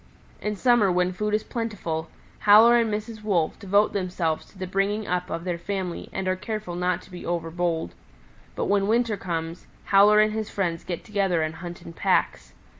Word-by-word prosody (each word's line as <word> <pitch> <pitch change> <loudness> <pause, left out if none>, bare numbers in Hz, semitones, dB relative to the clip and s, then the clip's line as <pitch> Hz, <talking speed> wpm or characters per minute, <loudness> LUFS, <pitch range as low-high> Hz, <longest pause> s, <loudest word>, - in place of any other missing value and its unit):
In 210 0 -2
summer 240 -3 +3
when 180 +1 +1
food 210 +3 -1
is 215 - -1
plentiful, 190 -9 -4 0.3
Howler 220 +3 +7
and 230 -2 +1
Mrs. 215 +1 -4
Wolf 185 -7 0
devote 200 +1 +2
themselves 180 -4 -2
to - - -20
the 185 - -4
bringing 195 +3 -1
up 180 -1 -2
of 165 +1 -4
their 175 -2 -3
family 185 -1 -4
and 190 -1 -3
are 185 - +2
careful 215 -1 -5
not 180 0 -1
to - - -18
be 180 - -8
overbold. 170 - -2 0.6
But - - -1
when 200 0 +2
winter 230 0 +2
comes, 165 -3 -5 0.2
Howler 205 +2 +6
and 215 0 +3
his 220 -1 -3
friends 170 -4 -2
get 175 -2 -5
together 195 -6 0
and 155 0 -2
hunt 175 0 -8
in 165 - -10
packs. - - 0
190 Hz, 190 wpm, -25 LUFS, 175-210 Hz, 0.6 s, Howler